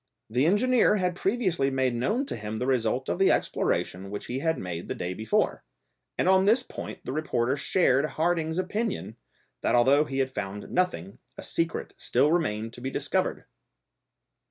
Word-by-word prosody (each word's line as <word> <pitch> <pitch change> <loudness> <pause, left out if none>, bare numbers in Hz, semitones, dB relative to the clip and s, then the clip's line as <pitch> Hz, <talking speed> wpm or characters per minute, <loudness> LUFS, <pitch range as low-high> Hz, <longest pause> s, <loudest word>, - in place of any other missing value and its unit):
The 125 +6 +2
engineer 225 +3 +4
had 180 -3 0
previously 185 - +1
made 130 -2 +1
known 210 - 0
to - - -4
him 105 0 -5
the 125 - -2
result 130 0 0
of - - -2
the 195 - +5
exploration 95 +2 -1
which 105 +1 -5
he 125 +2 -3
had 160 +2 0
made 85 -2 -5
the - - -3
day 90 +1 -3
before, 110 +3 0 0.5
and - - +1
on 190 0 +5
this 230 +5 +4
point - - -8
the - - -3
reporter 130 -4 0
shared 140 -2 +2
Harding's 160 +1 0
opinion, 195 - -2 0.5
that - - +2
although 135 +5 +5
he 135 -2 -5
had 130 -1 0
found 105 -3 -5
nothing, 100 - -1 0.2
a - - -7
secret 165 0 -2
still 150 - +2
remained 115 -10 0
to 120 - -11
be 130 - -2
discovered! - - -1
135 Hz, 175 wpm, -27 LUFS, 115-180 Hz, 0.5 s, the